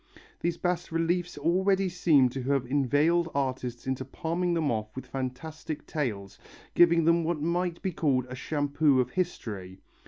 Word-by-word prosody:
These 170 0 -1
bas 180 -2 -2
reliefs 170 +1 0
already 190 +5 +2
seem 160 -7 +4
to 135 +2 -5
have 135 0 0
inveigled 145 +6 +2
artists 130 -3 -2
into 130 0 -2
palming 170 +6 -2
them 155 -5 +1
off 110 -1 -3
with 130 0 -6
fantastic 135 +4 -5
tales, 100 -10 -4 0.3
giving 170 -1 +5
them 170 0 +4
what 165 -1 -1
might 170 +2 -1
be 190 - 0
called 135 -6 +1
a 125 - -8
shampoo 145 0 +1
of 125 0 0
history. 105 - -4
150 Hz, 155 wpm, -28 LUFS, 130-170 Hz, 0.3 s, giving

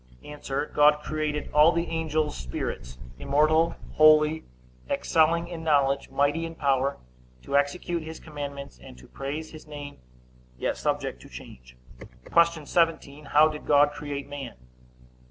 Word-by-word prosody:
A. 150 - -9 0.4
God 150 0 +4
created 155 -1 -3
all 150 +3 +6
the 170 0 -1
angels 155 -2 -1
spirits, 65 0 -5 0.2
immortal, 155 - +2 0.2
holy, 155 0 +5 0.4
excelling 165 +1 +2
in 170 -2 -7
knowledge, 140 -3 +2
mighty 145 +4 +1
in 165 0 -6
power, 140 -2 0 0.5
to 140 - -3
execute 165 +4 0
his 160 +1 -8
commandments, 140 - -8
and 60 - -13
to 60 - -15
praise 145 +4 -6
his 155 -1 -12
name, 145 -1 -9 0.6
yet - - -1
subject - - -2
to - - -14
change. 60 0 -13 0.2
Q. 160 - 0
17. 160 -3 0
How 150 +2 +5
did 150 -1 -7
God 145 0 +5
create 145 -2 -6
man? 140 -3 -7
150 Hz, 135 wpm, -26 LUFS, 140-160 Hz, 0.6 s, all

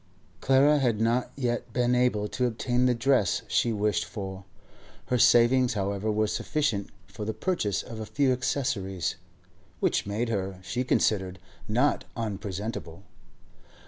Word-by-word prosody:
Clara 140 +3 +4
had 120 -6 +1
not 115 +3 +1
yet 120 -3 -2
been 125 0 +2
able 125 -4 +2
to 125 - 0
obtain 125 +2 0
the 125 - +2
dress 120 -5 +2
she 120 - +1
wished 105 -1 0
for. 95 -3 -7 0.6
Her 125 - +2
savings, 120 +2 +5
however, 100 +1 -1
were 110 +1 +1
sufficient 110 -2 -1 0.2
for 100 +3 -8
the 110 +1 -3
purchase 105 - -1
of 115 -2 -8
a 110 - -5
few 140 -3 +2
accessories, 120 - -1 0.6
which - - +1
made 110 +4 -1
her, 95 -3 -2
she 125 +6 -2
considered, 95 -7 +1 0.3
not 125 +7 +1
unpresentable. 100 -4 -5
115 Hz, 140 wpm, -27 LUFS, 100-125 Hz, 0.6 s, savings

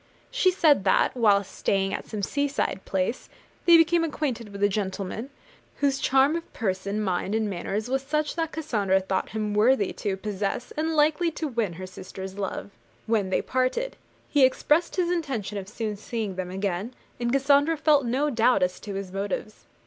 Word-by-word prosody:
She - - +3
said 320 - +4
that, - - +3
while 205 -5 +4
staying 195 0 -1
at - - -4
some 210 -2 -5
seaside 280 -6 -1
place, 190 +5 -2 0.4
they 340 -1 +9
became 330 +1 +4
acquainted 275 -8 -2
with 200 0 -4
a - - +7
gentleman, 200 +4 -3 0.5
whose 280 -1 +1
charm 270 +4 +3
of 335 - -5
person, 200 -1 -2
mind, 190 +1 -1
and 220 -1 +1
manners 200 +3 -3
was 265 +1 0
such 300 +2 -1
that 325 -1 -1
Cassandra 215 -12 +1
thought 190 0 -2
him 215 -1 -2
worthy 210 0 +3
to 195 -2 -3
possess 205 +4 -3
and 320 +1 -1
likely 310 +3 +3
to 315 - -3
win 230 -9 -1
her 185 +3 -7
sister's 190 +1 -8
love. 200 +1 -4 0.3
When 215 -4 +1
they - - +1
parted, 260 - -1 0.3
he 290 -2 +3
expressed 300 +6 +3
his 355 -2 +1
intention 260 - -2
of 190 0 -9
soon 215 -1 -3
seeing 215 -1 -4
them 185 -1 -4
again; 195 +4 -3 0.2
and 240 0 0
Cassandra 280 +4 +3
felt 300 -2 +4
no 265 +5 0
doubt 230 -4 +3
as 180 0 -1
to 200 -2 -6
his 195 -1 -5
motives. 200 +2 -4
225 Hz, 180 wpm, -26 LUFS, 195-285 Hz, 0.5 s, they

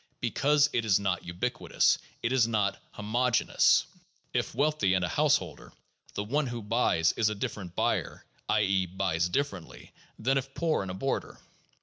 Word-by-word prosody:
Because 145 +1 +2
it 115 - +1
is 105 -4 +3
not 95 -3 -1
ubiquitous, 115 +8 0 0.2
it 115 - 0
is 130 -4 +3
not 105 -3 0
homogeneous. 115 +3 +2 0.5
If - - -1
wealthy 140 -9 +2
and 90 -1 +1
a - - -2
householder, - - 0 0.4
the 100 - -2
one 140 +7 0
who 120 -2 -5
buys 105 -7 +2
is 110 -2 +1
a 105 - -3
different 95 -3 -5
buyer - - -1
— - - -25
i. - - +3
e., 95 -1 +1
buys 90 -2 -1
differently 140 - -4
— - - -33
than 135 +1 +4
if 135 +1 -9
poor 165 -2 0
and 95 - -5
a 90 - -5
boarder. 135 +8 -3
110 Hz, 175 wpm, -29 LUFS, 95-130 Hz, 0.5 s, than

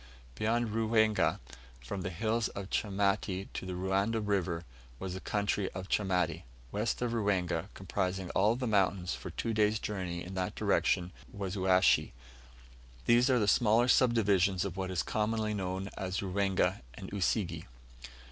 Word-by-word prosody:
Beyond 115 - 0
Ruwenga, 110 0 +2 0.4
from 65 +11 -5
the 90 - -3
hills 110 +5 0
of 100 -1 -7
Chamati 100 -1 0
to 95 - -5
the 90 - -3
Ruanda 95 +5 0
River, 95 -5 -1 0.3
was 95 +3 -5
the 95 - -5
country 100 -1 -1
of 95 +1 -6
Chamati. 90 -5 +1 0.3
West 110 +4 -1
of 120 - 0
Ruwenga, 95 -6 0
comprising 95 0 -2
all 105 +4 +3
the 125 +1 -3
mountains 95 -4 +1
for - - -6
two 115 - -3
days' 105 0 +3
journey 90 -5 -4
in 90 - -8
that 95 -1 -2
direction, 90 0 +1 0.2
was 100 -1 -4
Uashi. 95 -1 +3 0.9
These 120 +3 +5
are 130 - +4
the 105 -3 +1
smaller 115 +3 +4
sub 125 -1 +4
divisions 95 -4 +2
of 95 -3 -4
what 95 -1 -3
is 90 -3 -1
commonly 110 0 -1
known 95 0 -3
as 95 -1 -3
Ruwenga 95 -2 +1
and - - -8
Usige. 100 -1 -1
100 Hz, 155 wpm, -31 LUFS, 95-110 Hz, 0.9 s, These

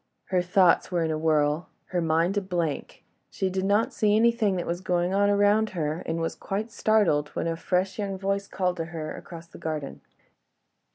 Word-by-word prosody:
Her 185 -1 +2
thoughts 180 0 +3
were 175 -2 +1
in 160 - 0
a 155 - -1
whirl—her 155 +3 0
mind 165 +4 +1
a 205 - +1
blank... 175 -5 -3 0.3
She 190 -1 -2
did 190 0 -1
not 205 +3 +2
see 210 -1 +2
anything 225 -3 +3
that 175 - -2
was 175 +1 -3
going 180 0 0
on 200 +1 +3
around 205 +2 +3
her, 155 0 -1
and 165 +1 -1
was 165 0 -1
quite 215 +4 -4
startled 200 -11 +2
when - - -1
a 165 0 -1
fresh 185 +4 -1
young 195 -2 -2
voice 195 +1 -1
called 180 -1 -1
to 165 - -2
her 160 -1 -6
across 165 -1 -10
the 165 - -14
garden. 155 -3 -4
180 Hz, 190 wpm, -26 LUFS, 165-200 Hz, 0.3 s, thoughts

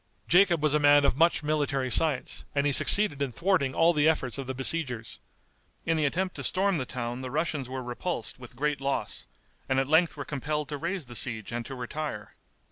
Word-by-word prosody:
Jacob 175 -3 +4
was 150 -2 +2
a 150 - +3
man 145 -1 +5
of - - +2
much 165 +1 +3
military 145 -4 -1
science, 150 -3 +1
and 140 0 +1
he 145 - +2
succeeded 145 0 +3
in 140 -3 -1
thwarting 165 -2 0
all 165 +1 +4
the 150 0 +3
efforts 140 -4 -1
of 135 - -5
the 130 - -3
besiegers. 130 -4 -1 0.7
In 165 - +1
the 155 -1 +1
attempt 185 +5 -2
to - - -5
storm 195 -2 +1
the 130 - -4
town 120 0 -4
the 130 - -5
Russians 150 -2 -2
were 130 0 -5
repulsed 125 +1 -4
with 125 0 -12
great 145 +1 -1
loss, 140 0 -3 0.4
and 130 0 +2
at 135 - 0
length 160 +2 +3
were 140 - -5
compelled 150 0 -3
to 145 - -4
raise 170 +2 -3
the 120 0 -9
siege 110 -3 +1
and 120 0 -3
to 135 - -7
retire. 125 -3 -5
145 Hz, 210 wpm, -28 LUFS, 130-160 Hz, 0.7 s, man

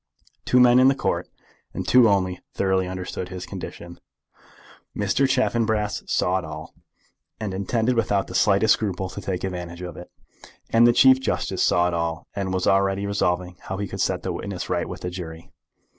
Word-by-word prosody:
Two 125 - +4
men 125 0 +6
in 130 - +6
the 135 - +4
Court, - - -2 0.5
and - - -4
two 125 -3 +6
only, 95 -2 +1 0.2
thoroughly 95 -1 +1
understood 90 0 -5
his 90 -1 -6
condition. 85 0 -8 1.0
Mr. 105 +7 +1
Chaffanbrass 110 -5 0
saw 95 +1 +1
it - - -8
all, 75 0 -8 0.7
and 105 -3 -4
intended 110 +6 0
without 105 -4 +1
the - - -10
slightest 105 +2 +4
scruple 95 -3 -3
to - - -7
take 95 -2 -4
advantage 90 -2 -5
of 90 - -7
it. 90 - -10 0.6
And 115 +1 +6
the - - +6
Chief 130 +1 +6
Justice 130 - -2
saw 90 0 +3
it 90 - -2
all, 85 0 -2
and 95 -2 -2
was 95 -1 -1
already 95 0 +2
resolving 90 -3 -1
how 95 - -6
he 100 0 -3
could - - -5
set - - 0
the - - -2
witness - - -5
right - - -1
with - - -7
the 90 - -4
jury. 85 -1 -8
95 Hz, 185 wpm, -23 LUFS, 90-110 Hz, 1.0 s, men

